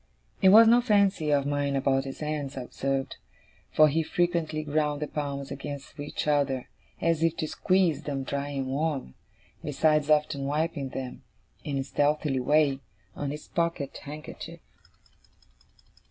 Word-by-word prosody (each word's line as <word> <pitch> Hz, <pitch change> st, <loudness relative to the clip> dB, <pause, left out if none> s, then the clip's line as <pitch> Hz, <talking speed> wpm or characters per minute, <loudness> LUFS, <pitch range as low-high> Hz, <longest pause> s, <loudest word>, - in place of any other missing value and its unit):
It 190 Hz, -, +7 dB
was 220 Hz, +3 st, +9 dB
no 240 Hz, +2 st, +6 dB
fancy 200 Hz, -8 st, +2 dB
of 140 Hz, -2 st, +2 dB
mine 145 Hz, -1 st, 0 dB
about 135 Hz, 0 st, +1 dB
his 135 Hz, +2 st, -7 dB
hands, 150 Hz, -3 st, -3 dB
I 130 Hz, -, -3 dB
observed; 135 Hz, +2 st, -3 dB, 0.5 s
for 155 Hz, -, +6 dB
he 155 Hz, +3 st, +1 dB
frequently 160 Hz, -2 st, 0 dB
ground 150 Hz, -1 st, 0 dB
the 150 Hz, -, -3 dB
palms 140 Hz, -2 st, -4 dB
against 140 Hz, +1 st, -7 dB
each 145 Hz, 0 st, -4 dB
other 140 Hz, -3 st, +1 dB, 0.3 s
as 165 Hz, -1 st, +1 dB
if 165 Hz, 0 st, +2 dB
to 160 Hz, -1 st, -2 dB
squeeze 185 Hz, -2 st, +1 dB
them 140 Hz, -2 st, -3 dB
dry 140 Hz, +1 st, -3 dB
and 135 Hz, -2 st, -3 dB
warm, 140 Hz, -, -2 dB, 0.5 s
besides 150 Hz, +1 st, +2 dB
often 150 Hz, -2 st, +2 dB
wiping 145 Hz, -1 st, -1 dB
them, 130 Hz, -1 st, -6 dB, 0.4 s
in 140 Hz, -2 st, -2 dB
a 135 Hz, -, 0 dB
stealthy 145 Hz, 0 st, +1 dB
way, 145 Hz, +1 st, +3 dB, 0.4 s
on 145 Hz, -, -3 dB
his 150 Hz, +2 st, -7 dB
pocket 170 Hz, -5 st, -2 dB
handkerchief. 150 Hz, +1 st, -9 dB
145 Hz, 150 wpm, -27 LUFS, 140-155 Hz, 0.5 s, was